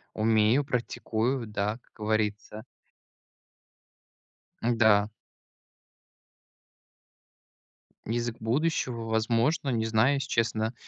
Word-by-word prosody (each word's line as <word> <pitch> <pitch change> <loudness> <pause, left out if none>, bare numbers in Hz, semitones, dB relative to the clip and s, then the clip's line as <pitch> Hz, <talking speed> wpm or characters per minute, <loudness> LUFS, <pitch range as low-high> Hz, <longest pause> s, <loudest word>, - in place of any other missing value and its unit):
Умею, 110 +4 +3
практикую, 120 -1 -2
да, 105 +1 -2
как - - -33
говорится. 110 0 -2 2.0
Н-да. 110 -3 +3 3.0
Язык 120 0 -2
будущего, 125 -1 -1
возможно, 115 +7 +1
не 115 -3 0
знаю, 110 +5 +3
если 140 - -3
честно, 115 0 0
115 Hz, 70 wpm, -28 LUFS, 110-120 Hz, 3.0 s, Умею